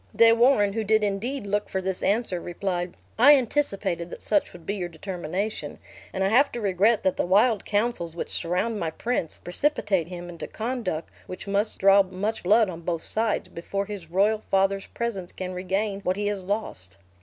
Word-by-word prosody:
De 230 0 +7
Warenne, 230 -4 +4
who 225 +1 -1
did 215 +1 +3
indeed 210 +5 -2
look 205 +1 -1
for 190 - -1
this 190 0 -3
answer, 200 -4 0
replied, 175 0 -3 0.2
"I 285 +5 +9
anticipated 215 -10 -1
that - - -9
such 205 -2 +1
would 175 -2 -13
be 200 - -1
your 180 -4 -3
determination, 185 +4 -4 0.3
and 190 - -1
I 190 - +2
have 265 +7 +4
to 240 - -3
regret 205 +2 +2
that 190 -1 +1
the - - +1
wild 210 +3 +3
counsels 205 -6 -1
which - - -5
surround 195 +6 -1
my 165 - -1
prince, 175 0 -2
precipitate 190 - 0
him 175 -1 -7
into 170 -1 -7
conduct 220 -9 -3 0.2
which 185 - -7
must 200 +2 0
draw 195 +1 +6
much 195 +4 -3
blood 215 +4 +4
on 170 -2 -7
both 165 -1 -2
sides, 220 -1 -1
before 195 +4 -3
his 195 -5 -8
royal 205 +5 +2
father's 195 0 +2
presence 205 -7 -4
can 185 0 -5
regain 195 +3 -2
what 185 -1 0
he 205 - -1
has 205 -2 -2
lost." 180 - -3
195 Hz, 190 wpm, -26 LUFS, 180-220 Hz, 0.3 s, I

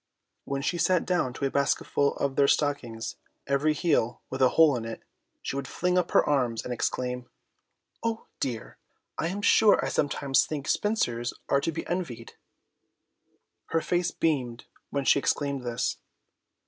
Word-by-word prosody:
When 140 0 -3
she 170 +4 -1
sat 180 0 +2
down 175 -8 +1
to 140 - -3
a 135 - 0
basketful 140 0 +1
of 140 -1 -1
their 140 - +4
stockings, 125 -7 -1 0.3
every 140 +3 +2
heel 145 -7 +1
with 130 - -3
a 130 - +6
hole 160 -4 +7
in 120 - -3
it, 115 0 -7 0.4
she - - -3
would 140 -1 -3
fling 180 0 0
up 180 -1 +2
her - - +3
arms 125 -6 +1
and 125 - -2
exclaim, 125 +1 -2 0.7
"Oh 230 -1 -2
dear, 120 -4 -4 0.4
I - - +1
am 200 +4 -4
sure 215 -1 +6
I - - -1
sometimes 140 -1 +2
think 145 -2 -5
spinsters 120 - 0
are 140 - +3
to 165 - -1
be 160 - -5
envied!" 130 -11 -4 1.3
Her 165 - 0
face 175 +1 0
beamed 130 -9 -1 0.2
when 140 -1 -2
she - - +5
exclaimed 140 -1 0
this. 120 0 -2
140 Hz, 160 wpm, -27 LUFS, 125-165 Hz, 1.3 s, hole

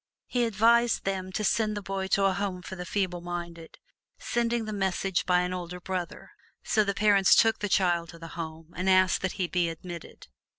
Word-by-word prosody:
He 245 -1 0
advised 230 +2 +3
them 190 -1 -3
to 215 - -2
send 215 0 +1
the - - -3
boy 195 0 -3
to 195 +1 +2
a 195 - +3
Home 185 -2 -3
for 190 - -7
the 180 -1 -7
Feeble 185 -4 -1
Minded, 170 -1 -7 0.4
sending 235 -1 -1
the 215 - -4
message 190 -1 -1
by 180 -1 +4
an 180 0 -2
older 180 0 -5
brother. 180 -1 -5 0.3
So 215 - +2
the 200 -1 -2
parents 200 -3 +5
took 225 -1 +4
the 205 - -2
child 175 -3 +2
to 170 - -11
the 165 0 -9
Home 160 0 -8
and 185 +1 -1
asked 185 0 +4
that 190 - -1
he 190 - -1
be 175 -1 0
admitted. 170 +1 -9
185 Hz, 205 wpm, -28 LUFS, 175-205 Hz, 0.4 s, parents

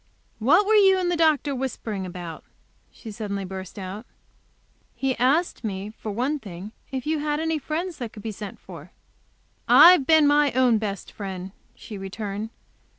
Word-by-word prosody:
"What 320 - +4
were 435 - +2
you 390 -3 +6
and 360 -1 0
the - - +1
doctor 310 -3 +2
whispering 225 -7 -4
about?" 175 -3 -8 0.5
she 225 - -10
suddenly 200 -2 -4
burst 190 0 -8
out. 195 +4 -7 0.9
"He 265 -1 -1
asked 280 +8 +1
me, 200 -1 -4
for 220 0 -8
one 260 +8 -1
thing, 195 -2 -9 0.2
if 260 -2 -4
you 310 0 0
had 295 0 -1
any 320 -1 -1
friends 330 +4 -4
that 240 -4 -5
could 210 - -12
be 225 - -3
sent 210 -1 -8
for." - - -12 0.7
"I've 345 -6 +8
been 315 -2 +6
my 290 -1 +4
own 250 -3 +3
best 200 -3 -5
friend," 190 -2 -6 0.2
she 210 -3 -9
returned. 200 +2 -5
235 Hz, 165 wpm, -24 LUFS, 200-300 Hz, 0.9 s, I've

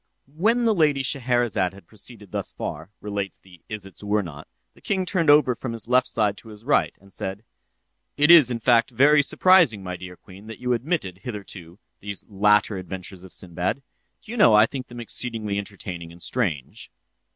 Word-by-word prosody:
'" - - -50 0.2
When 235 +2 +3
the 225 - +4
Lady 150 -7 +2
Scheherazade 120 -8 0
had 100 - -15
proceeded 105 0 -11
thus - - -4
far, 80 +4 -6
relates 100 -1 -4
the 90 -3 -19
"Isitsöornot," 100 -5 -4 0.3
the - - -22
king 190 -2 -1
turned 175 -4 0
over 145 -3 +6
from 120 0 -6
his 115 -1 -4
left 125 +1 +3
side 105 -2 0
to - - -15
his 105 0 -13
right, 145 - +2
and 100 0 -17
said: 95 +3 -4 0.7
"It 150 +3 +5
is, 155 -8 +8
in 120 -2 -2
fact, 115 0 +3
very 145 +5 +5
surprising, 155 - +4
my 90 -1 -4
dear 90 0 -10
queen, 100 +1 -15
that 115 - -8
you 125 0 -1
omitted, 120 - -2
hitherto, 100 -5 -8 0.2
these 100 -1 -7
latter 105 0 +2
adventures 95 0 -8
of 95 - -12
Sinbad. 90 +10 -3 0.4
Do 220 - -11
you 240 - -5
know 115 - +6
I 105 +1 +7
think 130 +2 -6
them 120 0 -10
exceedingly 115 -3 -3
entertaining 90 -4 -7
and 85 - -14
strange?" 70 -6 -3
105 Hz, 185 wpm, -24 LUFS, 95-130 Hz, 0.7 s, is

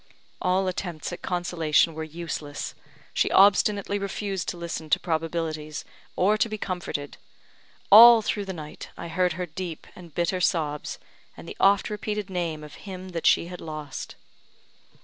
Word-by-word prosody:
All 185 +1 +2
attempts 175 -3 -4
at - - -7
consolation 170 -3 +1
were 160 +1 -5
useless; 155 -2 -5 0.4
she - - +2
obstinately 200 0 +4
refused 195 -1 -3
to - - -5
listen 170 -2 -5
to - - +4
probabilities, 160 -2 -3 0.3
or 210 +4 +3
to 230 +1 +2
be 215 - -4
comforted. 175 -7 -4 0.7
All 230 +2 +10
through 205 -1 -1
the 190 - -4
night 155 -4 -8
I 170 - -6
heard 180 +1 +1
her 180 +2 -3
deep 170 0 -6
and 175 -2 -12
bitter 175 +4 -1
sobs, 155 -5 0 0.4
and - - -11
the - - -8
oft 200 +1 +4
repeated 210 -1 -3
name 165 -4 -2
of 150 - -11 0.2
him 185 0 -7
that 170 -2 -1
she - - +4
had 180 +1 -8
lost. 155 -3 -7
175 Hz, 155 wpm, -26 LUFS, 160-195 Hz, 0.7 s, All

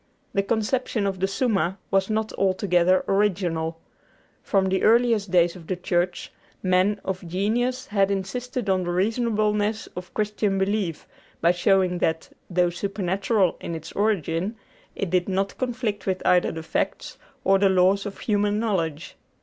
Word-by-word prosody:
The 200 - +2
conception 220 +1 -1
of 195 -2 -2
the 190 - +1
'Summa' 195 -4 0
was 195 +1 +2
not 220 0 -1
altogether 185 -1 +2
original. 175 -5 0 0.6
From 195 -2 +1
the 190 0 +1
earliest 230 -3 +3
days 175 -1 +3
of 170 -3 -12
the 185 - -1
Church, 175 0 -1 0.3
men 185 +2 +2
of 190 -1 -3
genius 240 +8 0
had 200 -2 +1
insisted 215 +5 -3
on 190 -1 +2
the 175 - -3
reasonableness 215 +2 0
of 180 0 -7
Christian 210 -2 0
belief 190 -4 -1 0.3
by 170 - +4
showing 180 0 +2
that, 160 -1 -1 0.2
though 175 -1 +2
supernatural 195 +1 0
in 170 - -4
its 160 -1 -8
origin, 195 -1 0 0.4
it 195 -4 -3
did 180 +1 +1
not 195 +1 -1
conflict 240 -6 -2
with 185 -1 -1
either 180 -1 +4
the 160 0 -6
facts - - -3 0.2
or 195 0 +4
the 195 0 +4
laws 190 +2 +3
of 195 - -9
human 205 -1 +1
knowledge. 170 -8 -2
195 Hz, 150 wpm, -24 LUFS, 180-210 Hz, 0.6 s, by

